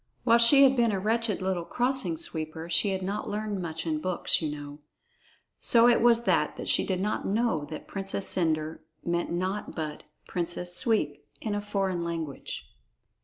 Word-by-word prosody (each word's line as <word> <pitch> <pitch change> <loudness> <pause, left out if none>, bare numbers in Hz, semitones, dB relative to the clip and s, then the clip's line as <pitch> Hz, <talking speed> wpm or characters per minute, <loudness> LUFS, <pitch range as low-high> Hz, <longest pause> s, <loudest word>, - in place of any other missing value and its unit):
(While 235 -1 +5
she 275 +4 +8
had 270 -1 +6
been 235 -3 +3
a 200 - 0
wretched 220 -1 0
little 185 -2 -1
Crossing 265 - 0
Sweeper, 160 - -4
she 170 +5 +3
had 190 -1 -2
not 200 +3 -3
learned 210 -2 -3
much 165 -1 -5
in 155 -2 -1
books, 185 0 +1
you 155 - -1
know. 145 0 -7 0.8
So 235 0 +5
it 240 -1 +4
was 235 0 +5
that - - +1
she - - +3
did 185 -2 -1
not 210 +3 -2
know 200 -7 0
that 155 +1 -8
"Princess 195 0 -2
Cendre" 160 -2 0 0.3
meant 170 0 -1
naught 185 +4 -3
but 155 -2 -4 0.3
"Princess 175 0 -2
Sweep" 205 - 0 0.2
in 215 - -3
a 205 - -1
foreign 195 -4 -1
language.) 165 -4 -5
190 Hz, 170 wpm, -28 LUFS, 165-225 Hz, 0.8 s, she